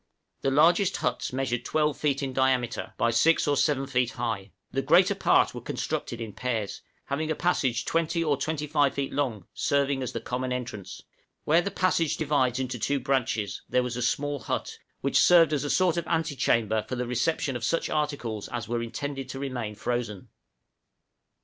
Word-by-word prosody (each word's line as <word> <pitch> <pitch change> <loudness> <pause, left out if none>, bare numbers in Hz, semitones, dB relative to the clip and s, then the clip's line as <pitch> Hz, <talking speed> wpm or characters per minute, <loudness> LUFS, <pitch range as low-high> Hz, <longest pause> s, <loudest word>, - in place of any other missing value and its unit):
{NATIVE - - -51
HUTS.} - - -49
The 135 - 0
largest 175 +3 +3
huts - - -2
measured 125 -2 -1
12 150 +2 +1
feet 140 -2 0
in 135 -1 -3
diameter, 130 -3 0
by 115 - +2
6 155 +10 +3
or 145 - +3
7 140 -1 +1
feet 125 -2 0
high; 110 -5 -3 0.2
the - - 0
greater - - +5
part - - +3
were - - -6
constructed 120 - -3
in 110 -3 -6
pairs, 115 -5 -3 0.2
having 155 +3 -2
a 155 - 0
passage 135 -10 0
20 165 0 0
or 150 -3 +2
25 145 -1 0
feet 140 -1 -2
long, 120 -10 -1
serving 140 -1 +1
as 125 -1 -3
the - - -3
common 125 +1 -3
entrance; 120 -6 -5 0.4
where 165 +3 +4
the 200 - -2
passage 185 -5 +1
divides 140 -5 +1
into 130 -2 -3
two 140 +5 0
branches, 120 -6 -1
there 125 - +2
was 125 -1 -3
a 125 - -3
small 145 +4 0
hut, - - -4 0.2
which - - +2
served 165 -3 +6
as 145 -2 0
a 145 - -2
sort 180 -1 +2
of 170 - -2
ante 160 -3 0
chamber 110 -3 +1
for 130 - -2
the 125 0 -2
reception 125 +3 0
of 120 - -4
such 165 - 0
articles 140 -9 -2
as 120 -1 -5
were 120 +1 -1
intended 135 +3 -5
to 135 - -5
remain 125 -6 -4
frozen. 115 -3 -3
135 Hz, 190 wpm, -27 LUFS, 120-150 Hz, 0.4 s, served